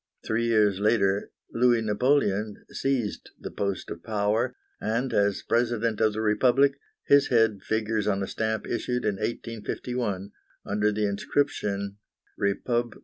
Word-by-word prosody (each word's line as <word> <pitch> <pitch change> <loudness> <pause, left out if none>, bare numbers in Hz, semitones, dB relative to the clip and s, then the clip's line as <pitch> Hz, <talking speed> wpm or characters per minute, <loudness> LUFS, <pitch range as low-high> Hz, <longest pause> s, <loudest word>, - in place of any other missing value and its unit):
Three 115 +1 0
years 105 -4 +3
later 100 -2 +2 0.2
Louis 120 -1 +3
Napoleon 105 -2 +1
seized 130 -6 -2
the - - -7
post 100 -2 -3
of 85 - -6
power, 110 +3 0 0.2
and, 115 +4 -1
as 100 -1 +1
President 115 -2 0
of 110 -1 +3
the 110 - -2
Republic, 130 +6 +3 0.3
his 140 0 +5
head 115 -4 +3
figures 110 -1 -1
on 100 -1 +1
a - - -3
stamp 110 -1 -2
issued 125 +1 -2
in 105 -2 0
1851, 110 -2 -3 0.3
under 105 +1 +1
the 105 0 0
inscription 100 -2 -1 0.4
"REPUB. 120 +4 -1
110 Hz, 135 wpm, -27 LUFS, 100-120 Hz, 0.4 s, his